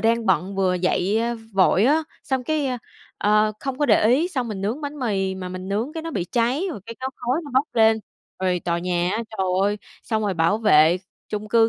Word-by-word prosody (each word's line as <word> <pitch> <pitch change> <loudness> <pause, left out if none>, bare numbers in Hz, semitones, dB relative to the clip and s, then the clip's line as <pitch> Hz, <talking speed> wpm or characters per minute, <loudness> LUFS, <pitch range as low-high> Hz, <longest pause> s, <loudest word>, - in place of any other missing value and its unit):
đang 230 0 +1
bận 190 +2 +1
vừa 185 -1 +2
dậy, 185 +3 +1
a, 235 +1 -1 0.2
vội 195 +1 +4
á, 305 +4 +4 0.2
xong 260 -2 -2
cái, 310 -1 0
ơ, 255 -1 -1 0.4
ờ, 215 +1 +3
không 270 -1 -4
có 290 - +2
để - - +4
ý, 285 +9 +3
xong 255 -9 -2
mình 200 -3 -5
nướng 220 +9 -2
bánh 290 0 -5
mì 195 -6 -1
mà 185 -1 -6
mình 185 +1 -7
nướng 220 +9 -1
cái 320 -1 -5
nó 330 - -5
bị 195 - -2
cháy 245 - 0
rồi 215 - -6
cái 230 - -7
có 260 - -2
khói 250 +6 -1
nó 285 - -9
bốc 275 +3 +3
lên. 220 -1 +4 0.4
Rồi 185 -1 0
tòa 170 -1 0
nhà 175 0 0
á, 220 - -1
trời 195 -3 -2 0.2
ơi, 205 +1 +1 0.3
xong 220 -2 -1
rồi 200 -3 0
bảo 165 +6 +2
vệ 165 -6 +5 0.3
chung 210 0 -4
cư 225 0 +4
215 Hz, 235 wpm, -23 LUFS, 190-255 Hz, 0.4 s, vệ